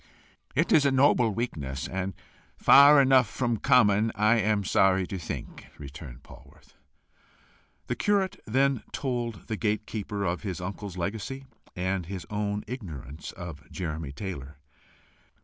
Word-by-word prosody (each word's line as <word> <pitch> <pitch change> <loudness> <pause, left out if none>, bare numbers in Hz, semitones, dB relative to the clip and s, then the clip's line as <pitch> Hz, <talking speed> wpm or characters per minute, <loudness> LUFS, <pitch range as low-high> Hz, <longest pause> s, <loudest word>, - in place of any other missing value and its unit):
"It - - +1
is 150 - +6
a 140 - +3
noble 130 -3 +4
weakness, 75 - -4
and 95 0 -4 0.4
far 145 +1 +8
enough 130 -4 +5
from 120 0 -1
common, 110 -4 +4
I 110 +2 +3
am 105 -1 +1
sorry 95 0 +3
to 95 +1 -5
think," 85 - -7
returned 70 -2 -10
Polwarth. - - -17 1.1
The - - -2
curate 200 -2 0
then 135 +2 +2
told 120 -5 -3
the 110 - -3
gate 105 0 -1
keeper 105 -2 -4
of 90 -1 -1
his 95 -5 -4
uncle's 95 +1 -6
legacy, 110 +9 -4 0.3
and 90 -1 -2
his 95 -2 -6
own 105 0 -2
ignorance 80 - -7
of 85 -6 -9
Jeremy 80 -5 -5
Taylor. 75 -3 -7
100 Hz, 135 wpm, -27 LUFS, 90-120 Hz, 1.1 s, far